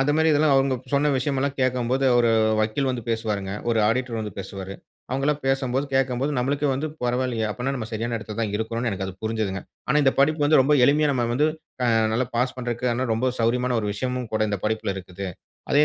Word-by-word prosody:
அந்த 135 +2 +2
மாதிரி 160 0 +3
இதெல்லாம் 150 0 +4
அவங்க 135 -1 +3 0.2
சொன்ன 145 +1 +3
விஷயம் 135 +2 -1
எல்லாம் 140 0 -1
கேட்கும்போது 130 +1 +1
ஒரு 120 -1 +4 0.3
வக்கீல் 110 +6 0
வந்து 125 -2 -3
பேசுவாருங்க. 105 -4 -2 0.2
ஒரு 115 - +2
ஆடிட்டர் 120 0 -1
வந்து 105 -3 -5
பேசுவாரு. 95 0 -6 0.4
அவங்க 135 +1 -1
எல்லாம் 150 0 +1
பேசும்போது, 135 0 0
கேட்கும்போது, 135 +1 +1
நம்மளுக்கே 140 +3 0
வந்து 140 +4 -2 0.2
பரவாயில்லையே! 125 -2 0
அப்படின்னா, 125 +6 -2
நம்ம 110 -4 -4
சரியான 115 +1 -2
இடத்தில 105 0 -7
தான் 110 -3 -1
இருக்கறோம்ன்னு 115 +2 -2
எனக்கு 95 -1 -3
அது 95 - -5
புரிஞ்சதுங்க. 110 -3 -2 0.3
ஆனா 150 - +3
இந்த 135 -1 +4
படிப்பு 155 +2 +3
வந்து 150 0 +5
ரொம்ப 150 +3 +2
எளிமையா 150 +1 +4
நம்ம 120 -2 0
வந்து 150 +4 +3 0.4
அ - - +3 0.3
நல்லா 120 +3 +1
பாஸ் 125 +1 +1
பண்ணறதுக்கு 120 0 -1
ரொம்ப 125 +3 +1
சௌரியமான 125 +2 +1
ஒரு 105 - -3
விஷயமும் 125 +1 -3
கூட 110 - 0
இந்த 100 - -1
படிப்பில 110 -2 -1
இருக்குது. 95 +1 -7 0.5
அதே 145 +1 +6
125 Hz, 200 wpm, -24 LUFS, 110-135 Hz, 0.5 s, அதே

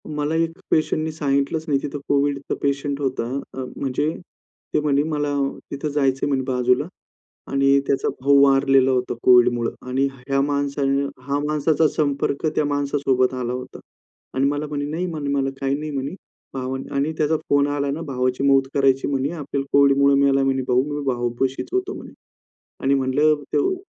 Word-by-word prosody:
मला 150 +1 -2
एक 165 +1 0
पेशंटनी 155 0 +1
सांगितलंच 145 +1 -1
नाही 140 -3 +2
तिथं 145 0 -5
कोविडचा 140 0 0
पेशंट 140 0 -1
होता. 130 -3 -1 0.3
अ, 130 - -4
म्हणजे 140 +3 -1 0.6
ते - - +3
म्हणे, 145 -1 +2
"मला 150 -2 -1 0.4
तिथं 140 +2 -3
जायचंय," 135 -2 +1
म्हणे, 135 -2 +1
"बाजूला." 125 -1 +1 0.6
आणि 140 0 +3
त्याचा 135 - +1
भाऊ 140 +1 +5
वारलेला 135 -1 +4
होता 125 -1 0
कोविडमुळं 120 -1 +4 0.2
आणि 135 +2 +1
ह्या 135 +1 -2
माणसाने 140 -1 0 0.2
हा 140 +2 -1
माणसाचा 150 +1 +2
संपर्क 140 0 0
त्या 150 - +2
माणसासोबत 140 -3 +1
आला 125 -1 -3
होता. 125 0 -7 0.5
आणि 135 +1 +1
मला 145 +1 -2
म्हणे, 145 -1 -3
"नाही," 160 +5 -3
म्हणे, 155 -5 -4
"मला 135 -1 +1
काही 135 0 +1
नाही," 155 +1 -5
म्हणी, 140 +2 -3 0.4
भाव 130 -1 -3 0.2
आणि 140 +3 0
"त्याचा 155 +1 +2
फोन 145 0 +3
आला 145 -1 -1
ना 150 +4 -4
भावाची 130 -1 -1
मौत 135 -1 +4
करायची," 135 -1 +2
म्हणी 140 0 0
"आपल्याला 145 -4 -4
कोविडमुळे 140 0 +5
मेला," 135 -1 +3
म्हणे 135 -1 +1
"भाऊ, 125 +1 +3
मी 145 0 -3
भावपाशीच 125 +1 -1
होतो," 380 +1 -1
म्हणे. - - -10 0.7
आणि 135 +1 +3
म्हटलं, 145 - +1
140 Hz, 160 wpm, -22 LUFS, 135-145 Hz, 0.7 s, भाऊ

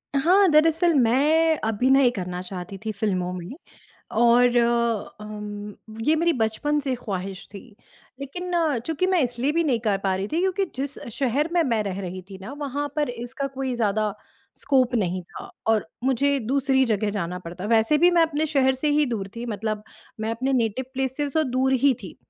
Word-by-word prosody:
हाँ, 370 +8 +5
दरअसल, 325 +2 +4
मैं 300 +6 +3
अभिनय 250 +4 +4
करना 180 -4 -5
चाहती 185 +1 -7
थी 220 - -1
फ़िल्मों 190 -4 -1
में, 180 0 -7 0.6
और 240 +1 +4 0.6
अम, 210 -1 -7 0.3
ये 315 - +4
मेरी 340 +2 +2
बचपन 285 +5 0
से 270 -2 -1
ख़्वाहिश 195 -5 -5
थी। 200 - -7 0.6
लेकिन 355 +7 -6 0.4
चूँकि 325 +3 0
मैं 370 -2 +2
इसलिए 245 +3 0
भी 335 +1 +2
नहीं 250 -6 +2
कर 210 -4 0
पा 190 -1 +2
रही 195 +2 -3
थी, 330 - -1
क्योंकि 380 +1 +1
जिस 270 +1 -4 0.2
शहर 275 +4 +1
में 345 -1 +3
मैं 230 -7 +1
रह 200 -1 -4
रही 185 0 -6
थी 190 - -9
ना, 195 +8 -8
वहाँ 290 0 -3
पर 295 -3 +1
इसका 245 +3 -5
कोई 265 -1 -3
ज़्यादा 215 -2 0 0.4
स्कोप 260 -3 +2
नहीं 185 -5 0
था, 175 - -11 0.2
और 220 -5 +2 0.2
मुझे 275 +2 +2
दूसरी 265 +2 +2
जगह 215 -2 0
जाना 180 -3 -3
पड़ता। 180 +2 -8
वैसे 225 +6 +3
भी 350 +3 +6
मैं 345 -1 +4
अपने 315 -1 0
शहर 265 -3 +2
से 280 +4 -1
ही 300 +1 +3
दूर 210 -5 -3
थी, 235 - -4
मतलब 215 -1 -3 0.4
मैं 220 +1 -1
अपने 260 +4 -1
नेटिव 240 0 0
प्लेस 265 0 -2
से 290 -1 -1
तो 315 +3 +2
दूर 260 +1 +1
ही 265 +1 +4
थी। 185 - -9
245 Hz, 185 wpm, -24 LUFS, 210-285 Hz, 0.6 s, भी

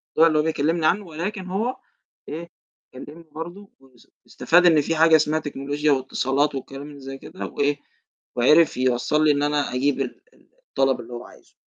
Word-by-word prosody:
الدواء 165 +1 +6
اللي 155 -2 +2
هو - - +2
جاي 160 - +1
بيكلمني 160 +3 0
عنه، 195 +5 +2
ولكن 185 +4 -5
هو 225 +8 -2 0.5
إيه؟ 170 +3 -6 0.4
كلمني 150 +6 -11
برضه 175 +6 -8 0.5
واستفاد 175 +2 +2
إن 160 -4 +6
في 165 +3 -2
حاجة 160 0 +6
اسمها 155 0 +2
تكنولوجيا 145 0 -2
واتصالات 135 +2 0
والكلام 135 +2 -7
اللي 145 -1 -12
زي 135 0 -8
كده 160 +6 -8
وإيه؟ 145 0 -1 0.6
وعرف 150 +5 +4
يوصّل 130 +4 +1
لي 150 - +5
إن 145 0 0
أنا 145 -2 0
أجيب 135 +1 +1
ال 125 - -5
ال - - -27 0.2
الطلب 135 -2 +1
اللي 120 +1 -11
هو 120 0 -7
عايزه. - - -18
150 Hz, 180 wpm, -23 LUFS, 135-165 Hz, 0.6 s, الدواء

